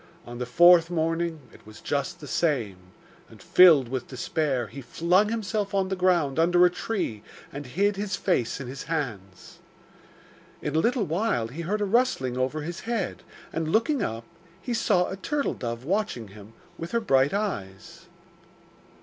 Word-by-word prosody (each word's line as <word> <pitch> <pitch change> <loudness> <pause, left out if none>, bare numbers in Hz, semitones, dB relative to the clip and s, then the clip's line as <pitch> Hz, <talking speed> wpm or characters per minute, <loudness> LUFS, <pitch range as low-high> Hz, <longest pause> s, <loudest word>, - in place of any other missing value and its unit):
On 120 0 -8
the 125 - -3
fourth 170 +4 +6
morning 165 -1 -1
it - - -17
was 110 - -12
just 140 +1 -3
the 145 - -8
same, 120 - 0 0.5
and, - - -15
filled 160 -8 +6
with 130 0 -4
despair, 135 -1 -1
he 135 +7 -9
flung 175 - +2
himself 210 -2 -2
on 190 -1 +1
the 190 - -1
ground 175 -6 +1
under 175 +2 +5
a 180 - +3
tree 180 - -3 0.3
and 140 -1 -7
hid 195 +9 0
his 205 0 -2
face 140 - 0
in 140 - -6
his 135 +2 -7
hands. 110 - -5 1.0
In 150 0 -4
a - - +4
little 235 +3 +1
while 165 - -1
he 150 +8 -7
heard 205 +6 -2
a - - +2
rustling 200 - +1
over 130 +4 -1
his 170 +3 -5
head, 230 -4 -3 0.3
and 165 -1 -2
looking 235 - +2
up, 115 - -3 0.4
he 245 - -4
saw 200 -6 +2
a 190 - -5
turtle 285 +8 -1
dove 115 -1 -5
watching 180 - -2
him 105 +2 -14 0.3
with 165 +5 -6
her 235 - +3
bright 135 -10 +3
eyes. 100 - -5
165 Hz, 170 wpm, -26 LUFS, 130-195 Hz, 1.0 s, fourth